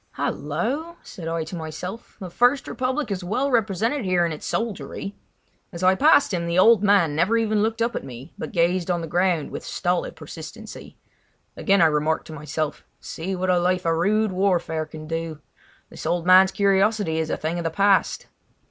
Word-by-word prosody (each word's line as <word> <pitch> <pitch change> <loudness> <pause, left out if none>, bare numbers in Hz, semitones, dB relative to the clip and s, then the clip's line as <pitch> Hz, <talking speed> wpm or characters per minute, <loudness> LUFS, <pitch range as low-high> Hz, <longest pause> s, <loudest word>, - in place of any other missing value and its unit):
"Hallo!" 260 - -3
said 165 -3 -9
I 165 0 -1
to 160 +3 -7
myself; 170 +7 -7
"the 185 -3 -7
First 245 +7 +2
Republic 260 0 -2
is 190 -2 -3
well 255 +10 -1
represented 225 +4 0
here 180 -2 +2
in 170 - -2
its 155 - -6
soldiery." 200 -3 -4 0.6
As 175 -1 -7
I 185 +1 +6
passed 285 0 +4
him 170 -1 -1
the 170 +1 -1
old 220 +2 +6
man 195 -7 +3
never 185 +9 +2
even 215 -2 +1
looked 225 +2 0
up 235 +1 -1
at - - -3
me, 130 0 -10
but - - -6
gazed 175 0 +1
on 175 -1 0
the 165 - -5
ground 175 -2 0
with - - -6
stolid 180 0 -2
persistency. 165 +8 -10 0.6
Again 195 -3 +3
I - - +7
remarked 155 0 +1
to 160 - -9
myself: 150 0 -4 0.2
"See 185 +4 -5
what 185 0 0
a 180 - +3
life 180 +1 0
of 165 - +2
rude 210 +5 +1
warfare 180 -4 0
can 155 0 -9
do! 165 -1 -4 0.5
This - - -7
old 175 -1 0
man's 185 +1 +7
curiosity 200 -3 +2
is 160 -1 -2
a - - -1
thing 165 +3 -3
of - - -3
the 165 - 0
past." 195 +4 +2
180 Hz, 190 wpm, -23 LUFS, 165-210 Hz, 0.6 s, I